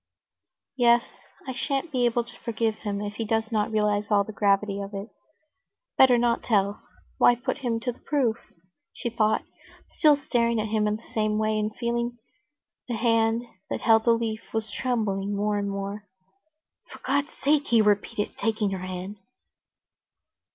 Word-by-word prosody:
"Yes, 240 -1 +5 0.4
I 260 - -3
shan't 275 +4 -2
be 250 -3 +1
able 240 0 +1
to 240 +1 -15
forgive 225 -2 -1
him 205 -2 -3
if 205 0 -5
he 230 - -1
does 220 +1 -1
not 215 -2 +1
realize 210 -1 0
all 205 -2 +4
the 220 - -9
gravity 200 0 +1
of 200 +1 -7
it. 200 +3 -6 0.9
Better 255 -2 +6
not 235 0 +1
tell; 200 -2 +1 0.4
why 245 - +6
put 245 +4 -3
him 240 -4 -1
to 245 - -1
the 240 - -17
proof?" 260 -6 0 0.6
she 235 - -4
thought, 220 -2 +1 0.6
still 305 -3 +7
staring 235 -4 +1
at 215 0 -2
him 215 -1 +1
in 210 - +1
the 220 - -13
same 215 -1 +1
way, 215 0 +1
and 215 0 -2
feeling 235 0 -2 0.7
the 240 - -2
hand 225 0 +2 0.3
that - - -3
held 225 -1 +4
the 235 - +6
leaf 225 -1 -2
was 220 -2 -2
trembling 205 -5 -1
more 205 0 0
and 200 0 -2
more. 200 +1 -5 0.8
"For - - -9
God's 285 +2 0
sake!" 290 +1 +1
he 235 - +4
repeated, 210 0 +1
taking 215 -2 0
her 190 - -3
hand. 185 +2 -6
220 Hz, 170 wpm, -26 LUFS, 210-240 Hz, 0.9 s, still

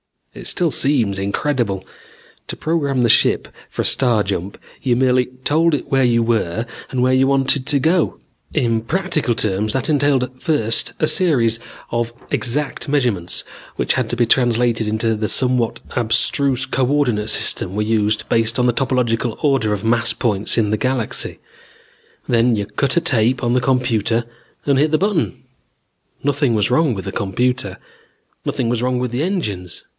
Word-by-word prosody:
"It - - -7
still 175 -4 +1
seems 120 -10 +1
incredible. 100 -1 -1 0.6
To - - -5
program 145 -5 -1
the 120 - +3
ship - - +3 0.2
for - - -3
a - - -3
star 120 -5 +2
jump, 95 0 -4 0.2
you 125 -2 +1
merely 125 0 +3 0.2
told 160 +3 +3
it - - -6
where 135 -1 +3
you 115 -1 +3
were 115 -2 0 0.2
and 125 -1 -1
where 130 0 +3
you 130 +1 +3
wanted 135 -1 +2
to 140 - +2
go. 165 +4 +1 0.4
In 115 -6 +1
practical 160 -2 -1
terms, 105 -2 -1
that 135 +1 -1
entailed 135 -3 +1
first 115 -8 +2
a - - +4
series 120 - +2 0.3
of 120 0 -1 0.2
exact 140 +4 -1
measurements 125 -12 -1 0.3
which - - 0
had 125 -3 -1
to 120 - -1
be 120 0 +2
translated 120 -2 +2
into 110 +1 0
the 105 0 -2
somewhat 125 -2 0 0.2
abstruse 125 +3 +2
co 130 -1 0
ordinate 125 -7 +1
system 95 - 0
we 105 - 0
used 110 -1 0
based 115 +1 +1
on 125 - +2
the 120 - +2
topological 120 -3 0
order 135 -8 +2
of 105 0 -4
mass 115 +1 +2
points 105 -4 0
in 105 -3 +2
the 110 - +1
galaxy. 130 -1 -2 0.9
Then 120 0 +3
you 100 -1 -2
cut 135 - -1
a - - +4
tape 125 -5 +1
on 120 - +1
the 125 - +2
computer 120 -3 +1 0.4
and 140 -2 +2
hit 150 +1 +2
the 155 - +3
button. 195 -3 -1 0.8
Nothing 140 -3 +1
was 105 +2 +1
wrong 150 0 +3
with 95 -3 -5
the 95 - -4
computer. 100 0 -1 0.7
Nothing 125 - -1
was 120 -1 -1
wrong 125 0 0
with 125 -1 -2
the 125 +3 -2
engines. 105 - -3
125 Hz, 170 wpm, -19 LUFS, 110-135 Hz, 0.9 s, a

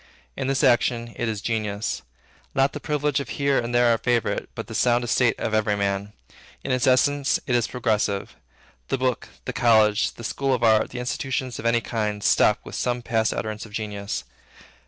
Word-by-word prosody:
In 135 - -3
this 135 +1 +1
action, 120 -2 +2
it 120 - -2
is 105 -3 -3
genius; 110 -2 -2 0.5
not 135 +1 +3
the - - -5
privilege 150 -2 0
of 140 - -5
here 140 -1 +1
and 120 - -3
there 120 -1 +4
a 115 - -1
favorite, 120 -3 0
but - - -5
the - - -9
sound 120 0 +2
estate 120 0 +2
of 110 - -2
every 105 -1 +2
man. 100 0 -2 0.5
In 135 - -3
its 125 -1 +1
essence, 140 +2 +3
it 125 - -1
is 120 -1 +2
progressive. 105 -5 -1 0.5
The - - 0
book, 130 -2 -1 0.2
the - - -3
college, 110 -3 +3
the 115 - -10
school 135 +3 0
of 120 - -4
art, 110 -1 +4
the 125 - -8
institution 130 +1 -2
of 115 - -3
any 115 0 +3
kind, 105 -3 -2
stop - - +4
with - - -10
some 120 0 -1
past 110 -1 +1
utterance 110 -1 -4
of 105 - -17
genius. 100 -6 -4
120 Hz, 195 wpm, -24 LUFS, 110-130 Hz, 0.5 s, there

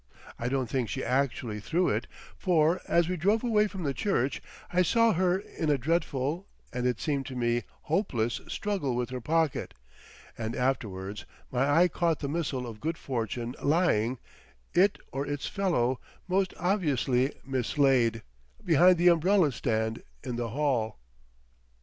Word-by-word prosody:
I 120 - -1
don't 130 -2 0
think 125 -1 -1
she 130 - -3
actually 125 -5 -1
threw 170 - +1
it, - - -1 0.3
for 170 0 +2
as 170 -1 +3
we 180 0 -1
drove 205 +8 +2
away 215 -3 +3
from 190 -3 -6
the 140 -2 0
church 135 -4 0 0.3
I 180 - +4
saw 230 +5 +4
her 180 +1 +2
in 165 -5 -4
a 145 - +3
dreadful, 155 +3 -1 0.3
and, 125 0 0
it 125 -2 0
seemed 140 -4 -1
to 130 - -6
me, 120 -1 0 0.2
hopeless, 130 - 0
struggle 190 -12 -2
with 125 0 -2
her 130 -1 -4
pocket; 160 +3 0 0.6
and 115 0 -4
afterwards 105 -7 -2 0.3
my 130 +3 +1
eye 180 - +6
caught 170 -2 0
the 140 - -4
missile 145 -4 -2
of 110 -3 -8
good 165 +1 -2
fortune 120 -1 -3
lying, 140 -7 +2 0.6
it 195 +3 +4
or 135 +1 -2
its 145 -1 -3
fellow, 130 -11 0 0.3
most 190 0 +1
obviously 145 - +1
mislaid, 130 -3 +2 0.4
behind 175 +2 +6
the 175 +1 +3
umbrella 175 -1 +4
stand 110 -2 -1 0.2
in 125 -2 -4
the 120 -1 -2
hall.... 120 - 0
140 Hz, 155 wpm, -29 LUFS, 120-175 Hz, 0.6 s, eye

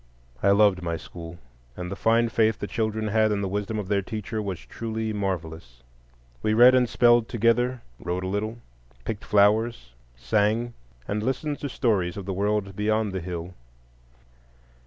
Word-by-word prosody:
I - - +3
loved 100 -2 +4
my 85 -1 -2
school, 85 +1 -10 0.4
and 90 0 -5
the - - -3
fine 115 +3 +2
faith 110 -1 +2
the - - -4
children 110 0 -2
had 110 0 +3
in 100 -1 0
the 100 - -1
wisdom 105 +3 -2
of 105 -3 -4
their 100 0 +1
teacher 110 +2 -4
was 95 -4 -3
truly 110 - -4
marvellous. 80 -11 -4 0.6
We 110 +7 +1
read 125 +3 +8
and 125 -2 +3
spelled 120 -1 +4
together, 120 +2 +1 0.2
wrote 90 +1 -3
a - - -2
little, 105 +4 -2 0.5
picked 110 -2 -4
flowers, 105 - +2 0.2
sang, 110 - 0 0.3
and 105 +1 -1
listened 135 +5 -2
to 145 - -4
stories 100 -10 0
of 100 - -6
the 95 - -3
world 100 0 -1
beyond 110 0 0
the 95 -1 -3
hill. 85 0 -6
105 Hz, 165 wpm, -25 LUFS, 95-115 Hz, 0.6 s, read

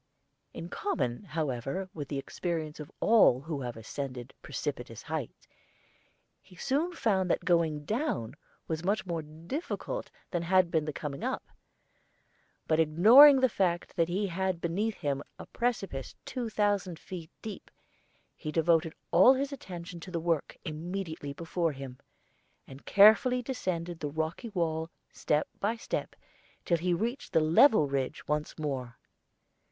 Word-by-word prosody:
In 165 - -7
common, 175 - -2
however, 150 +3 -2
with 145 -3 -5
the 140 - -3
experience 155 +1 -4
of 150 - -8
all 215 - +5
who 150 -1 -4
have 120 -2 -5
ascended 125 +2 -6
precipitous - - -5
heights, - - -5 0.9
he 185 - -18
soon 295 - 0
found 195 - +1
that - - 0
going 160 -4 +2
down 220 - -1 0.3
was 160 0 -3
much 200 +3 0
more 170 -3 -2
difficult 170 - -5 0.2
than 175 - 0
had 180 0 +3
been 160 -2 +1
the 155 - -2
coming 140 -1 -5
up; - - -2 1.2
but 160 0 +2
ignoring 230 - +8
the 260 - +6
fact 180 -6 -1
that 165 -1 +2
he 195 +4 0
had 190 -1 -1
beneath 195 +6 -1
him 140 -1 -2 0.2
a - - -9
precipice 195 - -3
two 245 -3 -3
thousand 205 -5 0
feet 170 -2 -8
deep, 215 -2 -7 0.7
he 155 - -5
devoted 165 0 +2 0.2
all 260 - +7
his 275 +2 -2
attention 175 -8 -8
to 175 - -9
the 170 -2 -2
work 165 -2 -1
immediately 160 -1 -4
before 165 +2 -1
him, 130 -2 -8 0.7
and 135 +1 -13
carefully 220 +5 +6
descended 175 -9 -3
the 150 - -3
rocky 160 - -3
wall 165 -4 -1 0.2
step 150 0 0
by 215 +3 0
step, 225 - -4 0.5
till 170 - +2
he 180 +2 0
reached 230 +10 -2
the - - +5
level 160 - +5
ridge 135 +1 -3
once 150 0 -2
more. 130 -6 -4
170 Hz, 145 wpm, -30 LUFS, 150-200 Hz, 1.2 s, ignoring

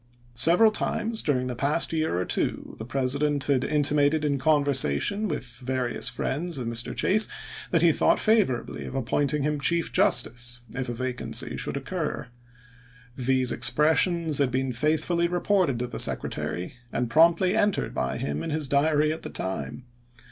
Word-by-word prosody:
Several 170 - +5
times 220 +1 -1
during 130 -4 0
the 125 -1 -4
past 145 +7 +1
year 155 - -1
or 90 - -1
two - - -3
the 110 - -6
President 140 +3 0
had 135 -3 +1
in 150 -1 0
timated 145 +1 +2
in 140 -2 0
conversation 145 - +2
with 150 -7 -4 0.2
various 125 -1 -1
friends 150 +7 -3
of 125 - -4
Mr. 115 0 -3
Chase 215 +3 +2 0.4
that 165 -2 +1
he 170 - +6
thought - - +2
favorably 215 - 0
of - - -7
appointing 140 +3 0
him 150 0 -1
chief 170 +4 0
justice 120 0 +2
if 130 -1 -4
a - - -3
vacancy 130 +1 -3
should - - -3
occur. 150 -3 -4 0.9
These 130 -1 +1
expressions 155 +6 +2
had 140 -3 +2
been 130 +1 -1
faithfully 155 +6 0
reported 175 -5 +1
to 125 - -2
the - - -7
Secretary, 90 +1 -1 0.2
and 120 - -1
promptly 170 +7 +3
entered 205 -2 0
by 65 - -2
him 75 +1 -3
in - - -4
his 155 -1 -1
diary 150 +2 +2
at 160 - -8
the - - -7
time. 95 +6 -5
145 Hz, 160 wpm, -25 LUFS, 125-160 Hz, 0.9 s, he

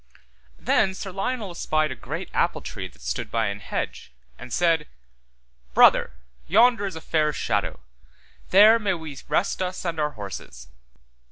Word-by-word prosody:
Then 190 - +1
Sir 195 0 -6
Lionel 205 +1 -3
espied 155 -3 0
a - - -4
great - - -6
apple - - +1
tree - - -6
that - - -19
stood - - -3
by 115 -2 0
an 100 0 -5
hedge, 100 - -5 0.3
and 125 - -10
said, 165 -1 +2 0.9
Brother, - - +6 0.3
yonder 220 +1 +4
is 190 - -6
a 160 - -7
fair 155 -2 +1
shadow, 145 - -2 0.7
there 215 +4 +7
may 200 -4 0
we 160 -4 -8
rest 190 - 0
us 185 0 -3
[and] 165 -2 -2
our 150 -1 0
horses. 95 - -8
165 Hz, 155 wpm, -24 LUFS, 145-195 Hz, 0.9 s, there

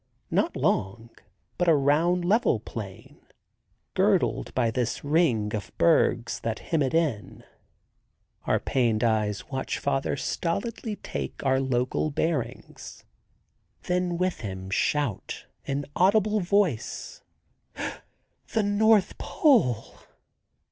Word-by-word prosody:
Not - - +1
long, 115 +4 -1 0.5
but 175 - +2
a 165 - +6
round 160 +6 +2
level 200 - +3
plain, 105 -3 -9 0.7
girdled - - +1
by 120 -3 +2
this 120 0 -2
ring 145 -9 +2
of 105 -2 -4
bergs 125 -7 +2
that 115 -1 -3
hem 165 -3 -1
it 135 +2 0
in. 150 -11 -1 1.0
Our - - +2
pained 115 -4 +1
eyes 110 0 0
watch 130 -1 -2
father 135 0 -1
stolidly 215 +5 -2
take 70 - -6
our 130 0 +3
local 130 +3 0
bearings, 145 -5 -4 0.8
then 180 -1 0
with 180 0 -1
him 95 -3 -6
shout 145 0 -1 0.2
in 140 +1 -2
audible 210 +3 +3
voice: 180 - -1 1.3
"The 220 - +2
North 205 0 +3
Pole!" 225 - +2
140 Hz, 105 wpm, -26 LUFS, 115-180 Hz, 1.3 s, a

